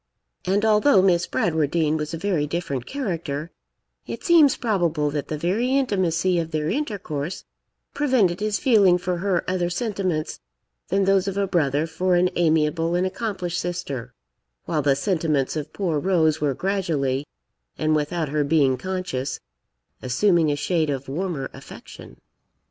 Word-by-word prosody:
And 200 Hz, +3 st, +1 dB
although 210 Hz, -1 st, +5 dB
Miss 175 Hz, -3 st, +3 dB
Bradwardine 160 Hz, -1 st, +1 dB
was 150 Hz, -1 st, -3 dB
a 165 Hz, -, -4 dB
very 165 Hz, -4 st, 0 dB
different 140 Hz, -6 st, -3 dB
character, 170 Hz, -, -4 dB, 0.6 s
it -, -, -6 dB
seems 320 Hz, -6 st, +5 dB
probable 170 Hz, -10 st, 0 dB
that 145 Hz, -2 st, -3 dB
the 155 Hz, -, -3 dB
very 220 Hz, -, +1 dB
intimacy 185 Hz, -8 st, +1 dB
of 165 Hz, -1 st, -3 dB
their 155 Hz, -1 st, -2 dB
intercourse 195 Hz, -, -4 dB, 0.5 s
prevented 245 Hz, -12 st, +2 dB
his 210 Hz, -1 st, 0 dB
feeling 200 Hz, -8 st, +4 dB
for 180 Hz, 0 st, -2 dB
her 185 Hz, -1 st, -1 dB
other 180 Hz, -1 st, 0 dB
sentiments 185 Hz, -5 st, -2 dB, 0.5 s
than 195 Hz, +2 st, +1 dB
those 195 Hz, 0 st, +3 dB
of 195 Hz, 0 st, -3 dB
a 200 Hz, -, +2 dB
brother 150 Hz, -5 st, +1 dB
for 180 Hz, +3 st, 0 dB
an 180 Hz, +1 st, +3 dB
amiable 165 Hz, 0 st, +1 dB
and 180 Hz, +1 st, +1 dB
accomplished 185 Hz, -3 st, -3 dB
sister; 135 Hz, -9 st, -5 dB, 0.5 s
while 155 Hz, -2 st, 0 dB
the 140 Hz, -1 st, +3 dB
sentiments 155 Hz, -5 st, 0 dB
of 150 Hz, -1 st, -4 dB
poor 170 Hz, -7 st, -1 dB
Rose 160 Hz, -3 st, +2 dB
were 145 Hz, -3 st, +1 dB
gradually, 150 Hz, -8 st, -1 dB, 0.5 s
and 155 Hz, 0 st, +1 dB
without 155 Hz, +1 st, -1 dB
her 150 Hz, +1 st, +1 dB
being 140 Hz, -3 st, +2 dB
conscious, 180 Hz, -8 st, -3 dB, 0.6 s
assuming 160 Hz, +4 st, +2 dB
a -, -, 0 dB
shade 155 Hz, +1 st, 0 dB
of 135 Hz, -1 st, -3 dB
warmer 155 Hz, -3 st, -3 dB
affection. -, -, -12 dB
170 Hz, 150 wpm, -23 LUFS, 150-190 Hz, 0.6 s, although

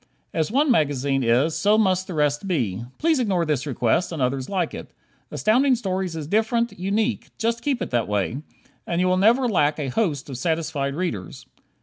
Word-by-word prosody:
As 160 Hz, +3 st, -1 dB
one 280 Hz, +3 st, +3 dB
magazine 140 Hz, -, +1 dB
is, 125 Hz, +7 st, +2 dB
so 210 Hz, +1 st, +3 dB
must 185 Hz, -3 st, +2 dB
the 180 Hz, -, -5 dB
rest 150 Hz, +4 st, 0 dB
be. 115 Hz, -, -1 dB
Please 320 Hz, -3 st, +2 dB
ignore 190 Hz, -8 st, +1 dB
this 150 Hz, -2 st, -1 dB
request, 130 Hz, +6 st, 0 dB
and 165 Hz, -, -5 dB
others 130 Hz, 0 st, -1 dB
like 185 Hz, -4 st, -1 dB
it. -, -, -8 dB, 0.4 s
Astounding 255 Hz, +5 st, +3 dB
Stories 190 Hz, -6 st, -3 dB
is 155 Hz, -2 st, -4 dB
different, 225 Hz, +5 st, 0 dB
unique; 210 Hz, +5 st, -1 dB
just 230 Hz, +1 st, -1 dB
keep 275 Hz, -5 st, -1 dB
it -, -, -7 dB
that 120 Hz, -2 st, 0 dB
way, 105 Hz, +6 st, -1 dB, 0.5 s
and 170 Hz, -, -1 dB
you 180 Hz, -, +2 dB
will 185 Hz, -, +3 dB
never 235 Hz, +7 st, +4 dB
lack 150 Hz, -9 st, +2 dB
a 145 Hz, -3 st, -3 dB
host 145 Hz, -, -1 dB
of 130 Hz, -3 st, -6 dB
satisfied 155 Hz, -3 st, -1 dB
readers. 115 Hz, -, -4 dB
170 Hz, 190 wpm, -23 LUFS, 140-215 Hz, 0.5 s, never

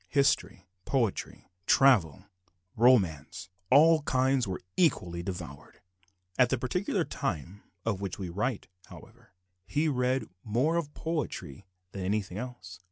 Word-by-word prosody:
History, 140 Hz, -9 st, +1 dB, 0.2 s
poetry, 120 Hz, -7 st, -2 dB, 0.2 s
travel, 105 Hz, -, +4 dB, 0.5 s
romance 95 Hz, -, +2 dB, 0.2 s
all 155 Hz, +4 st, +6 dB
kinds 130 Hz, -3 st, +1 dB
were 95 Hz, -2 st, -5 dB
equally 90 Hz, -, +1 dB
devoured. 85 Hz, -2 st, -8 dB, 0.6 s
At 125 Hz, -, +5 dB
the 130 Hz, -, +1 dB
particular 180 Hz, -, -1 dB
time 90 Hz, -, -4 dB, 0.2 s
of 100 Hz, -4 st, -1 dB
which 100 Hz, -3 st, -4 dB
we 95 Hz, -, -5 dB
write, 105 Hz, +6 st, -2 dB, 0.2 s
however, -, -, -16 dB, 0.3 s
he 150 Hz, +2 st, 0 dB
read 130 Hz, -2 st, 0 dB, 0.2 s
more 125 Hz, +10 st, +1 dB
of 155 Hz, -4 st, -2 dB
poetry 140 Hz, -, -4 dB, 0.2 s
than 100 Hz, -, -6 dB
of -, -, -3 dB
anything 100 Hz, -1 st, -2 dB
else. 120 Hz, -7 st, -8 dB
120 Hz, 125 wpm, -29 LUFS, 95-135 Hz, 0.6 s, all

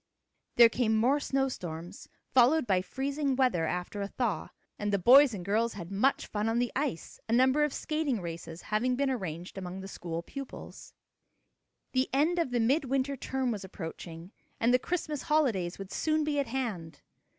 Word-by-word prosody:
There 235 Hz, -, +9 dB
came 230 Hz, -1 st, +1 dB
more 255 Hz, +6 st, +3 dB
snow 270 Hz, -1 st, 0 dB
storms, 175 Hz, -5 st, -7 dB, 0.2 s
followed 260 Hz, +4 st, +5 dB
by 190 Hz, -4 st, +2 dB
freezing 275 Hz, +5 st, -2 dB
weather 245 Hz, -12 st, +2 dB
after 180 Hz, +4 st, -3 dB
a 200 Hz, -, -2 dB
thaw, 230 Hz, 0 st, -2 dB, 0.3 s
and 205 Hz, -1 st, -1 dB
the 200 Hz, -, +3 dB
boys 260 Hz, +8 st, +7 dB
and 180 Hz, -3 st, -7 dB
girls 225 Hz, +4 st, +1 dB
had 175 Hz, -2 st, -8 dB
much 235 Hz, +8 st, +1 dB
fun 210 Hz, +1 st, -2 dB
on 225 Hz, -, 0 dB
the 245 Hz, 0 st, 0 dB
ice, 270 Hz, -, -3 dB
a -, -, -1 dB
number 260 Hz, +5 st, +4 dB
of 295 Hz, -, +1 dB
skating 305 Hz, -5 st, -1 dB
races 165 Hz, -1 st, -7 dB
having 240 Hz, +4 st, 0 dB
been 275 Hz, +1 st, +1 dB
arranged 180 Hz, -5 st, -5 dB
among 185 Hz, 0 st, -6 dB
the 190 Hz, -, -7 dB
school 170 Hz, -3 st, -5 dB
pupils. 275 Hz, +7 st, -9 dB, 1.0 s
The 255 Hz, +1 st, +1 dB
end 315 Hz, +6 st, +2 dB
of 330 Hz, -, +1 dB
the 245 Hz, -1 st, 0 dB
mid 270 Hz, +7 st, +2 dB
winter 270 Hz, +1 st, 0 dB
term 260 Hz, -1 st, -2 dB
was 205 Hz, -3 st, -4 dB
approaching, 170 Hz, -1 st, -8 dB, 0.3 s
and 235 Hz, +2 st, +3 dB
the 250 Hz, -, +5 dB
Christmas 305 Hz, -2 st, -3 dB
holidays 230 Hz, -, +1 dB
would 195 Hz, -1 st, -8 dB
soon 310 Hz, -1 st, +1 dB
be 295 Hz, -1 st, 0 dB
at 280 Hz, -, 0 dB
hand. 205 Hz, -, -4 dB
235 Hz, 185 wpm, -30 LUFS, 190-270 Hz, 1.0 s, There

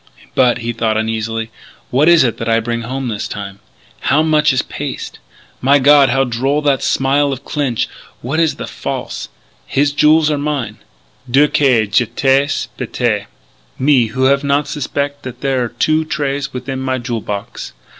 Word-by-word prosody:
"But," 125 Hz, -2 st, +3 dB
he 120 Hz, -1 st, -4 dB
thought 110 Hz, -1 st, 0 dB
uneasily, 110 Hz, 0 st, -2 dB, 0.4 s
"what 145 Hz, +6 st, +4 dB
is 170 Hz, -4 st, +6 dB
it 120 Hz, -3 st, 0 dB
that 115 Hz, -, -3 dB
I 115 Hz, 0 st, +3 dB
bring 115 Hz, +1 st, -3 dB
home 130 Hz, +3 st, -4 dB
this 110 Hz, -3 st, -3 dB
time? 100 Hz, -1 st, -7 dB, 0.4 s
How 150 Hz, +3 st, +2 dB
much 155 Hz, -1 st, +3 dB
is 130 Hz, -, +1 dB
paste? -, -, -6 dB, 0.4 s
My 140 Hz, +3 st, +5 dB
God, 140 Hz, 0 st, +6 dB
how 135 Hz, +2 st, +2 dB
droll 135 Hz, +4 st, -1 dB
that 140 Hz, -2 st, +2 dB
smile 140 Hz, +1 st, +1 dB
of 135 Hz, 0 st, -6 dB
Clinch.... 135 Hz, -6 st, -1 dB, 0.4 s
Which 140 Hz, +7 st, -1 dB
is 165 Hz, -2 st, +2 dB
the -, -, -6 dB
false -, -, -5 dB, 0.4 s
his 145 Hz, +1 st, +1 dB
jewels 155 Hz, +1 st, +4 dB
or 145 Hz, -, -1 dB
mine? 145 Hz, -4 st, -3 dB, 0.5 s
Dieu 140 Hz, +4 st, +5 dB
que 130 Hz, -7 st, +3 dB
j'étais 135 Hz, +6 st, +1 dB
bête! 115 Hz, -4 st, -1 dB, 0.5 s
Me 130 Hz, -4 st, +3 dB
who 130 Hz, +4 st, -2 dB
have 140 Hz, +2 st, +3 dB
not 140 Hz, +1 st, +1 dB
suspec' 145 Hz, 0 st, -3 dB
that 125 Hz, -1 st, -8 dB
there 135 Hz, -3 st, 0 dB
are -, -, -5 dB
two 155 Hz, +5 st, +1 dB
trays 145 Hz, -2 st, -2 dB
within 130 Hz, +1 st, -5 dB
my 130 Hz, 0 st, -1 dB
jewel 120 Hz, -2 st, -3 dB
box!... 100 Hz, -11 st, -6 dB
135 Hz, 170 wpm, -16 LUFS, 115-145 Hz, 0.5 s, is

